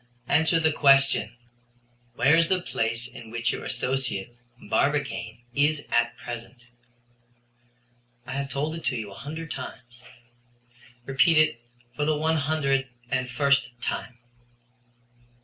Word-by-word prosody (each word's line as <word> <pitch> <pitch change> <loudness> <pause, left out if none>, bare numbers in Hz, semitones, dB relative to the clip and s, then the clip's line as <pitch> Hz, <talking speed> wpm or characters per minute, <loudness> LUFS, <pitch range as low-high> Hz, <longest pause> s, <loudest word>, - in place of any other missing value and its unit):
"Answer 160 +2 +3
the 160 -1 +3
question, 135 -4 +4 0.8
where 145 +3 +5
is 165 0 +4
the 185 +1 +2
place 115 -7 -2
in 120 -2 -11
which 115 0 0
your - - -5
associate, 125 -3 -2 0.2
Barbicane, 130 -3 -1
is 145 +2 +1
at 120 0 +2
present." 120 +1 -8 1.6
"I 130 - -7
have 140 0 -3
told 140 +4 -2
it 165 - -6
to - - +1
you 110 -4 -5
a - - -9
hundred 155 +8 -7
times." 125 -2 -8 1.0
"Repeat 135 +4 +4
it 155 -6 +3 0.3
for 150 - 0
the 155 0 +2
one 160 +1 +1
hundred 140 -3 +1 0.2
and 130 -1 0
first 140 -1 +2
time." 120 0 -4
135 Hz, 130 wpm, -26 LUFS, 120-150 Hz, 1.6 s, where